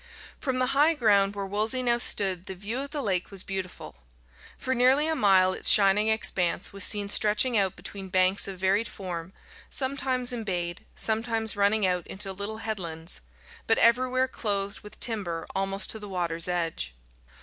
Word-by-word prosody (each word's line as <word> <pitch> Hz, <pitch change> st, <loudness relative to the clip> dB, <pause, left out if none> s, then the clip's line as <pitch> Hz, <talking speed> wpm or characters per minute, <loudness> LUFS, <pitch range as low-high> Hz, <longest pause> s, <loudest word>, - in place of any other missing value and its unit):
From 265 Hz, -3 st, -2 dB
the 255 Hz, -, +1 dB
high 300 Hz, +4 st, +4 dB
ground 205 Hz, -6 st, +3 dB
where 200 Hz, -1 st, -4 dB
Wolsey 215 Hz, +6 st, -1 dB
now 240 Hz, -1 st, +2 dB
stood 190 Hz, -6 st, 0 dB
the 190 Hz, -, -6 dB
view 210 Hz, +7 st, -4 dB
of 280 Hz, +1 st, -5 dB
the 290 Hz, -1 st, -4 dB
lake 185 Hz, -5 st, -1 dB
was 195 Hz, -2 st, -3 dB
beautiful. 190 Hz, -, -6 dB, 0.6 s
For 260 Hz, -, -2 dB
nearly 260 Hz, +4 st, +4 dB
a 320 Hz, -, 0 dB
mile 190 Hz, -8 st, +4 dB
its -, -, +1 dB
shining 205 Hz, +1 st, +5 dB
expanse 185 Hz, -5 st, 0 dB
was 200 Hz, -, -1 dB
seen 205 Hz, -1 st, +5 dB
stretching 215 Hz, +4 st, +2 dB
out 195 Hz, -3 st, +1 dB
between 195 Hz, -2 st, -8 dB
banks 185 Hz, +2 st, +2 dB
of 195 Hz, -1 st, -7 dB
varied 195 Hz, +4 st, +1 dB
form, 180 Hz, -2 st, -7 dB, 0.4 s
sometimes 260 Hz, -2 st, -2 dB
embayed, 180 Hz, -7 st, -4 dB
sometimes 225 Hz, 0 st, +1 dB
running 205 Hz, +1 st, +2 dB
out 180 Hz, -2 st, -1 dB
into 195 Hz, 0 st, -5 dB
little 200 Hz, +3 st, -5 dB
headlands, 170 Hz, -6 st, -5 dB, 0.5 s
but 225 Hz, -, +3 dB
everywhere 255 Hz, +2 st, +3 dB
clothed 200 Hz, -5 st, -3 dB
with 210 Hz, -, -14 dB
timber 180 Hz, -8 st, -3 dB
almost 195 Hz, +1 st, 0 dB
to 220 Hz, -, -5 dB
the 205 Hz, -1 st, -9 dB
water's 170 Hz, -2 st, -1 dB
edge. 165 Hz, -, -3 dB
200 Hz, 170 wpm, -27 LUFS, 185-230 Hz, 0.6 s, shining